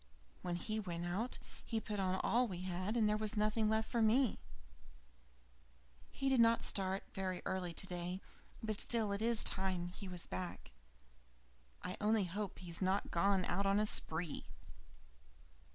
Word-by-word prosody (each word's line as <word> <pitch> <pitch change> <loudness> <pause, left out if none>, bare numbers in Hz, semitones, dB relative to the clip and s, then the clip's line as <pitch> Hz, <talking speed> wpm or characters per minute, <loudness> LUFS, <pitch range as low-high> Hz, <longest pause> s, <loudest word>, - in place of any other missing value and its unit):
When 175 -1 -2
he 215 +5 -2
went 175 -4 -3
out 200 +8 -2 0.3
he 225 - -1
put 210 -2 -4
on 185 -1 +1
all 245 +2 +3
we 180 -4 -5
had, 185 +4 -2
and 220 -2 +4
there 210 0 +1
was 215 +1 +2
nothing 215 +1 +2
left 220 0 +1
for 235 - 0
me. 230 +2 +3 1.7
He 275 - -3
did 265 -2 +4
not 230 0 +5
start 190 0 +2
very 185 -2 -3
early 185 -2 -1
today, 180 +1 -2 0.4
but 215 -2 -2
still 225 -4 +1
it's 220 +3 +2
time 185 -2 +2
he 190 +2 -8
was 180 -2 -3
back. 90 -1 -5 1.1
I 180 - -4
only 215 0 +3
hope 195 +2 -4
he 180 - -9
has 170 - -3
not 190 +2 +1
gone 190 +1 +3
on 195 +2 +2
the 210 - +3
spree!" 160 -5 0
195 Hz, 155 wpm, -37 LUFS, 180-220 Hz, 1.7 s, not